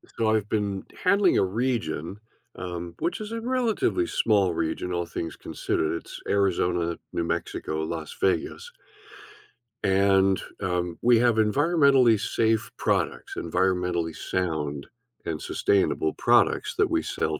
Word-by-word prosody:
So, 115 -1 +1
I've 105 -2 0
been 100 -3 -2 0.2
handling 195 0 +4
a - - +4
region, 95 - -2 0.4
um, 85 -1 -6
which 175 - -1
is 215 0 -6
a 230 - -3
relatively 255 - 0
small 100 - +2
region, 80 +2 -2
all 85 -1 -1
things 85 0 -5
considered, 80 - -2
it's - - -10
Arizona, 90 -4 +1 0.2
New 85 - -1
Mexico, 80 -1 -3
Las 80 -1 -5
Vegas. - - -1 1.1
And, 95 -1 +3 0.2
um, 90 -2 -2
we 120 -1 +5
have 120 -2 +3
environmentally 135 0 +4
safe 110 -1 0
products, - - -1
environmentally 90 -1 0
sound 75 -6 -2 0.4
and 80 -2 -3
sustainable 95 -5 +1
products - - +2
that - - +3
we - - +1
sell 80 -1 -2
95 Hz, 130 wpm, -26 LUFS, 85-115 Hz, 1.1 s, we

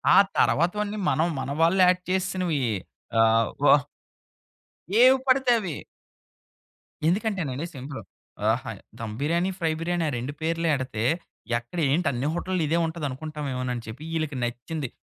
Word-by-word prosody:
ఆ - - +7 0.2
తరవాతవన్నీ 205 +6 +2
మనం 160 - +2
మన 130 +1 -3
వాళ్ళు 170 +4 +4
యాడ్ 180 0 +3
చేసేసినవి 185 -4 0 0.6
ఆహ్, 115 0 +4 0.2
వ - - +4 1.4
ఏవి‌పడితే 260 0 +5
అవి 180 -8 -4 1.3
ఎందుకంటేనండి 175 - -1
సింపుల్, 135 -2 -7 0.5
ఆహా, 120 +1 -2 0.3
దమ్ 110 -2 -5
బిర్యానీ, 170 +5 +1
ఫ్రై 165 -3 +1
బిర్యానీ 175 +1 -1
ఆ - - -3
2 125 +4 -4
పేర్లు 165 +1 0
ఎడితే, 130 -5 -2 0.5
ఎక్కడ 120 +9 -6
ఏంటి 170 +6 +2
అన్ని 130 +2 -2
హోటల్‌లో 180 0 -1
ఇదే 165 +3 +2
ఉంటది 160 -1 -4
అనుకుంటామేమో 140 -2 -4
అని 120 -1 -5
చెప్పి, 115 +7 -8
ఈళ్ళకి 155 -4 -2
నచ్చింది 125 +4 -4
160 Hz, 130 wpm, -26 LUFS, 130-180 Hz, 1.4 s, ఆ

